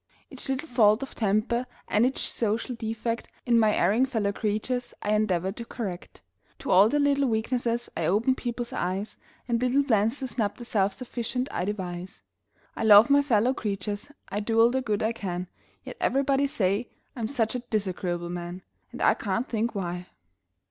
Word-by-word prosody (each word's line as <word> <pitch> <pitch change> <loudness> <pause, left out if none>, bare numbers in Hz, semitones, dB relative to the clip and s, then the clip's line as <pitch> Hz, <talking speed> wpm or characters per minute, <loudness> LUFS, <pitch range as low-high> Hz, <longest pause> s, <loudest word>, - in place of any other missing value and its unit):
Each - - -6
little 270 +4 -2
fault 225 -2 +4
of 270 - -8
temper 225 +4 0 0.2
and 225 +4 +3
each 265 - -2
social 225 +2 -1
defect 230 0 -3 0.2
In 235 -1 +4
my 215 -1 +4
erring 220 +9 +3
fellow 220 -6 0
creatures, 220 +4 -2
I 210 - +1
endeavor 190 -4 +1
to 235 +3 -7
correct. 200 -7 -7 0.3
To - - -4
all 195 +4 +7
their 295 - +1
little 280 -2 +3
weaknesses 235 +1 -1
I - - 0
open 220 +7 +3
people's 240 -2 -4
eyes 190 +4 -3 0.3
And 235 -1 0
little 255 +3 +3
plans 225 -1 +2
to 265 - -3
snub 220 -4 -1
the 240 - -8
self 200 -4 +1
sufficient 250 +3 -3
I 180 - -2
devise; 185 -2 -5 0.5
I - - -3
love 220 +3 +8
my 285 0 +6
fellow 250 -2 +2
creatures 205 +2 -4 0.2
I 205 - -2
do 225 +2 0
all 230 +1 +6
the 260 +1 0
good 215 -4 -1
I 220 - +2
can 180 -4 -4 0.4
Yet - - -9
everybody 275 +1 +2
say 205 -1 0 0.3
I'm 230 -4 -2
such 225 -4 0
a 250 - -2
disagreeable 185 -6 -2
man! 175 +1 -6 0.3
And - - -4
I - - +6
can't 205 +5 -2
think 230 0 -1
why! 180 -2 -4
225 Hz, 180 wpm, -27 LUFS, 200-245 Hz, 0.5 s, love